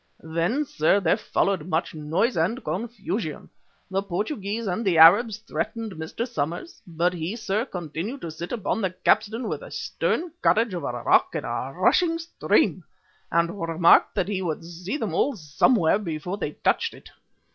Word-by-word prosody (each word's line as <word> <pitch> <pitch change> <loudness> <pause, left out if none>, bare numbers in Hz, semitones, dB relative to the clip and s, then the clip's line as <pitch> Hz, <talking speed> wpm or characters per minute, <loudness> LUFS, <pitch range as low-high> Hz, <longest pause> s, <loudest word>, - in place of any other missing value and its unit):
"Then, 170 - 0
sir, 175 - +2
there 175 -2 +3
followed 195 -5 -1
much 165 -2 -1
noise 160 +10 0
and 215 +11 0
confusion. 200 -1 -4 0.4
The 195 +1 +1
Portugee 200 - -3
and 225 -1 -2
the 185 -6 +2
Arabs 200 +7 +7
threatened 225 0 -4
Mr. 160 +8 -5
Somers, 175 - -4
but 170 +1 0
he, 175 +4 -3
sir, 215 0 -1
continued 180 - -5
to 165 - -5
sit 165 +2 -7
upon 225 -2 -1
the 190 - +1
capstan 220 +5 +1
with - - -3
the - - -10
stern 345 0 -2
courage 225 -2 +3
of 175 - -4
a - - -1
rock - - +3
in - - -3
a - - -3
rushing 335 -2 +3
stream, 330 +1 +1 0.5
and 170 +4 +1
remarked 165 +1 +4
that 190 -3 0
he 200 -2 -2
would 165 -2 -3
see 175 - -5
them 215 - -3
all 270 +10 +1
somewhere 170 - +2
before 175 0 -4
they 150 - -3
touched - - 0
it. - - -15
190 Hz, 170 wpm, -25 LUFS, 165-225 Hz, 0.5 s, Arabs